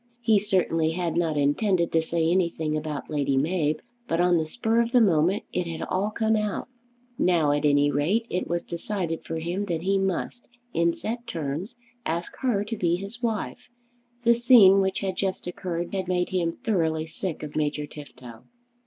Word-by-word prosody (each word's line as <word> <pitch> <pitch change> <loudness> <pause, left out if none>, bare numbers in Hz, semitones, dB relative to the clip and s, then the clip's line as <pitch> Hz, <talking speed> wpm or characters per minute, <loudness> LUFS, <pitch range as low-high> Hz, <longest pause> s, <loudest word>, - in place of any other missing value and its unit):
He 225 -3 +4
certainly 175 -5 +1
had 170 -2 -2
not 165 -3 +1
intended 170 +5 +2
to 165 - +3
say 160 0 0
anything 170 -4 0
about 155 -2 -4
Lady 140 -2 +1
Mab, 155 +1 0 0.2
but 165 - 0
on 175 0 +4
the 155 - -2
spur 230 +5 +1
of 235 0 -1
the 250 - +7
moment 185 -2 +3
it 180 -1 -1
had 165 -1 -4
all 195 +3 -1
come 220 0 +1
out. 210 -2 -2 0.5
Now 165 -5 +3
at 145 +1 +1
any 145 0 +4
rate 170 - +1
it 180 - -2
was 170 0 -1
decided 170 -1 -3
for 165 - -5
him 175 +5 -2
that 170 -4 -3
he 195 +1 +2
must, 195 +5 -2 0.3
in 170 0 +2
set 235 +2 -5
terms, 165 - -4 0.3
ask 170 -2 -3
her 235 -6 +1
to 220 +2 -4
be 175 -4 +1
his 200 +6 -7
wife. 225 -4 -3 0.5
The 235 0 +6
scene 230 -5 +7
which 190 0 -1
had 190 -2 -2
just 190 -1 -2
occurred 175 0 -4
had 190 -2 -2
made 180 -1 0
him 175 -3 0
thoroughly 165 -8 -1
sick 165 +1 -5
of 150 - -7
Major 150 -1 -1
Tifto. 125 -6 -12
175 Hz, 185 wpm, -26 LUFS, 160-200 Hz, 0.5 s, the